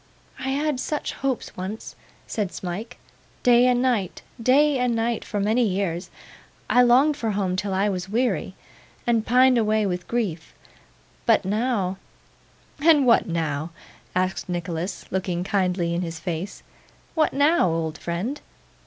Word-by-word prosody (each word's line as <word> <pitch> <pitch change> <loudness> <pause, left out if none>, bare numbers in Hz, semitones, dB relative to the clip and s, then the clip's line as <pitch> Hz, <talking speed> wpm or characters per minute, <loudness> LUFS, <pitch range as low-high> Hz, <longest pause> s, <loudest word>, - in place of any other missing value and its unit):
'I 265 - -3
had 285 0 0
such 300 +3 -3
hopes 270 -3 -3
once,' 190 +4 -6 0.3
said 205 -4 -2
Smike; 200 +7 -6 0.5
'day 245 0 +6
and 250 0 +3
night, 225 -8 0 0.2
day 275 +3 +4
and 250 -2 +1
night, 230 0 -1
for 205 - -3
many 215 +5 +2
years. 190 -5 -1 0.6
I 250 - +5
longed 260 +5 +5
for 230 -6 -2
home 195 -3 0
till 200 +1 -2
I 195 +2 +1
was 185 -2 -3
weary, 240 +4 0 0.5
and 230 -2 +2
pined 255 +1 +5
away 215 -1 +2
with 180 -2 -3
grief, 195 -9 -3 0.7
but - - +4
now 200 -3 0 0.4
' - - -32
'And 305 -4 +6
what 235 - +4
now?' 160 -2 -2 0.5
asked 185 0 -1
Nicholas, 175 +1 -3
looking 180 -2 -1
kindly 180 -3 0
in 170 - -1
his 165 -2 -4
face. 170 +3 -5 0.5
'What 315 -2 +2
now, 290 - +3
old 160 -1 -2
friend? 195 +12 -3
210 Hz, 145 wpm, -24 LUFS, 180-250 Hz, 0.7 s, day